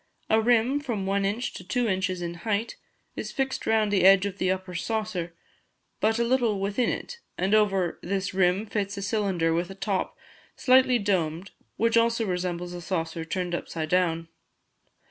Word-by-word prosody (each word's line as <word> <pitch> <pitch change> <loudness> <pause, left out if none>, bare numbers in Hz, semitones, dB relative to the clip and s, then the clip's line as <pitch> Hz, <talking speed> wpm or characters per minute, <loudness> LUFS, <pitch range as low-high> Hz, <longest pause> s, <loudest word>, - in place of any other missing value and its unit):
A 220 0 +5
rim, 240 +4 +3
from 235 -9 -3
1 195 0 +1
in. 205 +4 -1
to 215 - -5
2 240 +7 0
in. 190 -2 0 0.2
in 170 0 -3
height, 215 +4 -1 0.4
is - - -5
fixed 270 -2 -2
round 215 -2 +2
the 195 - +3
eage 195 +1 +7
of 200 0 -4
the 185 - +1
upper 185 -1 -2
saucer, 185 -3 -3 0.6
but 220 +1 +2
a 235 - +2
little 235 -4 +1
within 200 +5 0
it, 480 - -5 0.2
and 190 +3 0
over 195 -5 +2
this 195 +1 -2
rim 190 +2 +2
fits 205 -1 -3
a 200 - -4
cylinder 195 -6 0
with 175 +2 -1
a 195 - -8
top, 195 -1 -2 0.4
slightly 255 -1 +4
domed, 185 -4 -1 0.3
which 230 +1 +2
also 230 0 +2
resembles 180 -1 -3
a 175 - -6
saucer 165 -2 -3
turned 180 +1 -3
upside 160 -2 -3
down. 165 -2 +1
195 Hz, 175 wpm, -26 LUFS, 180-220 Hz, 0.6 s, eage